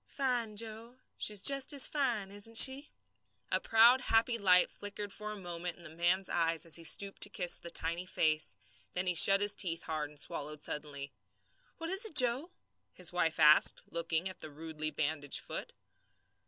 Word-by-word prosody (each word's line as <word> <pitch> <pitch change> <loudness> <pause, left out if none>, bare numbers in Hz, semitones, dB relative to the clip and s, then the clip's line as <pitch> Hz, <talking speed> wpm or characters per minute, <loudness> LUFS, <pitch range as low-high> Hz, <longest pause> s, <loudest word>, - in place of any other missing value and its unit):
"Fine, 245 -6 -3
Joe. 225 +3 -4 0.2
She's 210 -2 0
just 275 -1 +5
as 275 -2 +5
fine, 240 -9 -3
isn't 205 +3 -5
she?" 270 +4 +5 0.6
A - - 0
proud, 235 +3 +4
happy 230 0 0
light 180 -3 +4
flickered 205 0 -7
for 210 0 -6
a 210 - -8
moment 175 -2 -7
in 175 - -18
the 160 - -12
man's 175 +3 0
eyes 165 -2 0
as 165 - +1
he 165 - -11
stooped 195 +4 -1
to - - +3
kiss 180 -2 0
the 170 - -8
tiny 170 +2 0
face; 155 -3 -1 0.4
then 180 +1 -3
he 180 - +1
shut 195 +4 +5
his 205 0 +2
teeth 170 -3 -3
hard 155 -2 -5
and 150 -1 -6
swallowed 150 +1 -3
suddenly. 145 -2 -8 0.6
"What 330 +1 -5
is 385 +3 +1
it, 440 -8 -2
Joe?" 255 +5 +4 0.4
his 180 -1 -4
wife 165 -2 -2
asked, 150 0 +6
looking 170 +1 -3
at 185 - -10
the 155 - -9
rudely 155 +1 -6
bandaged 145 -2 -3
foot. - - -7
185 Hz, 180 wpm, -31 LUFS, 160-225 Hz, 0.6 s, asked